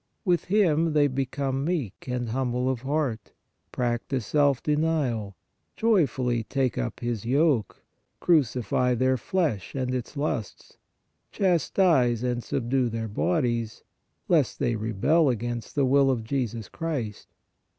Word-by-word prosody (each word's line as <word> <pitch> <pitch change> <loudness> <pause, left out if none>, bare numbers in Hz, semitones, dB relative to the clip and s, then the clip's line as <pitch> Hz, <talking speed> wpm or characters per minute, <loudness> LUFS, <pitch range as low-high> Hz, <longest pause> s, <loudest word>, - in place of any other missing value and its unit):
With 175 -3 +2
Him 165 -5 +2
they 150 -1 +4
become 135 0 -1
meek 145 - -3
and 125 -2 -2
humble 125 +1 -1
of 125 -3 -4
heart, 135 -5 -2 0.4
practise 120 0 -2
self 145 -3 +2
denial, 150 -10 0 0.4
joyfully 130 - +1
take 130 +1 -1
up - - -4
His 120 -4 -2
yoke, 135 -1 +1 0.4
cru 170 -3 +5
cify 125 0 -1
their 130 +2 +2
flesh 140 - -2
and 130 -1 -1
its 125 +3 -4
lusts, 140 -8 -4 0.5
chastise 165 - +2
and 120 -1 -1
subdue 125 0 0
their 115 0 -3
bodies, 120 - -1 0.4
lest - - +2
they 120 - 0
rebel 115 +9 +2
against 120 0 -3
the 140 -2 +3
will 135 +1 +4
of 125 -4 0
Jesus 115 -3 -3
Christ. 145 -11 -4
130 Hz, 130 wpm, -26 LUFS, 120-150 Hz, 0.5 s, cru